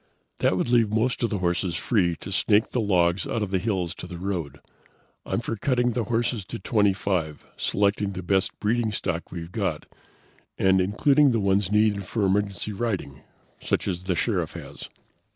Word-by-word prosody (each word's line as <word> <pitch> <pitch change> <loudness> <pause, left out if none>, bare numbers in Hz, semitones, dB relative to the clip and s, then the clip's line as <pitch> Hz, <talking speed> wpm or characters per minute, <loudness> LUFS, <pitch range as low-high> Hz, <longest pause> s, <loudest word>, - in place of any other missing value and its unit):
"This - - +3
would 95 - -1
leave 120 -3 +4
most 115 +3 +1
of 115 - +1
the 105 - -1
horses 90 -1 0
free 90 -4 +1
to 95 - -7
snake 105 +3 +2
the 125 - 0
logs 90 -3 +2
out 115 - -1
of 100 - -4
the 95 - +2
hills 95 -4 -1
to - - -9
the 90 -1 -7
road. 85 -6 -4 0.7
I'm - - -1
for 115 - -3
cutting 125 +2 +1
the 120 -1 -1
horses 120 -1 0
to - - -6
twenty 105 0 +2
five, 90 -6 -2
selecting 100 0 0
the 95 0 -6
best 95 +1 0
breeding 110 +1 +1
stock 90 -4 -3
we've 85 -1 -7
got, - - -2 0.7
and 95 0 +4
including 135 +8 +3
the 115 - +2
ones 100 -1 +1
needed 105 -2 +2
for 110 -4 0
emergency 100 +1 0
riding, 95 - -3 0.4
such - - -1
as 90 -1 -3
the 95 -2 0
Sheriff - - -1
has." - - -9
100 Hz, 185 wpm, -25 LUFS, 90-110 Hz, 0.7 s, leave